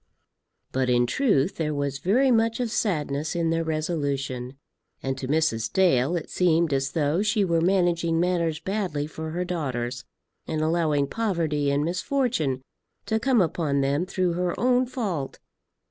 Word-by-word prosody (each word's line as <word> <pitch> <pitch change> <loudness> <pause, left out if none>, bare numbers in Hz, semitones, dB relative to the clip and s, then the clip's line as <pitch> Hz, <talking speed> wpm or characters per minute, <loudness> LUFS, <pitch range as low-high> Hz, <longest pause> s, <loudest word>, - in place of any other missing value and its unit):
But 130 -1 0
in 120 0 +3
truth 185 - +1
there 150 -2 -1
was 140 -1 -2
very 245 - +3
much 230 0 +2
of 240 -3 -1
sadness 150 -9 -1
in 165 -1 +1
their 165 0 +1
resolution, 140 -5 -2 0.5
and 135 0 -1
to 130 - -4
Mrs. 135 -7 +1
Dale 170 -5 +3
it 170 - -3
seemed 170 -3 +2
as 135 0 -1
though 155 +3 +1
she 210 -1 +2
were 170 -2 +1
managing 170 -2 +2
matters 170 -3 0
badly 185 -6 -2
for 160 +1 -6
her 175 +3 -2
daughters, 130 -8 -3 0.4
and 155 - -2
allowing 155 -3 +1
poverty 160 -7 -1
and 140 +1 +1
misfortune 175 - -1 0.4
to 220 0 0
come 245 -2 +3
upon 155 -4 0
them 140 +6 0
through 185 -2 0
her 175 0 -2
own 250 +1 +3
fault. 195 - -3
165 Hz, 155 wpm, -25 LUFS, 140-185 Hz, 0.5 s, in